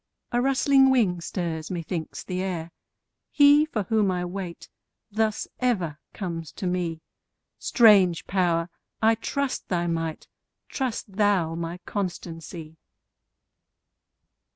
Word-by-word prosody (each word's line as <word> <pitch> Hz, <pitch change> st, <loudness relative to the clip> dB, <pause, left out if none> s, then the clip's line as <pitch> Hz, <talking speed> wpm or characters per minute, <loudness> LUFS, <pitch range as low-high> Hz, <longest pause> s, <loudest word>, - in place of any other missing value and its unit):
a 240 Hz, -, +2 dB
rustling 270 Hz, 0 st, +4 dB
wing 205 Hz, -10 st, +2 dB
stirs, 165 Hz, -3 st, -3 dB
methinks, 170 Hz, -2 st, -4 dB
the 185 Hz, -1 st, -3 dB
air: 175 Hz, -3 st, -3 dB, 0.6 s
He 290 Hz, +1 st, +6 dB
for 220 Hz, -9 st, -2 dB
whom 215 Hz, 0 st, +2 dB
I 180 Hz, -1 st, -1 dB
wait, 180 Hz, -1 st, -6 dB, 0.4 s
thus 215 Hz, 0 st, 0 dB
ever 185 Hz, -, 0 dB
comes 170 Hz, -5 st, -5 dB
to -, -, -6 dB
me; 175 Hz, -3 st, -1 dB, 0.6 s
Strange 200 Hz, -8 st, +5 dB
Power! 175 Hz, -3 st, +1 dB, 0.3 s
I 225 Hz, 0 st, +5 dB
trust 265 Hz, +4 st, -2 dB
thy 175 Hz, -2 st, 0 dB
might; 165 Hz, -2 st, -3 dB, 0.4 s
trust 230 Hz, -7 st, -3 dB
thou 200 Hz, -6 st, +2 dB
my 170 Hz, +1 st, -4 dB
constancy. 165 Hz, -4 st, -5 dB
185 Hz, 110 wpm, -26 LUFS, 170-220 Hz, 0.6 s, He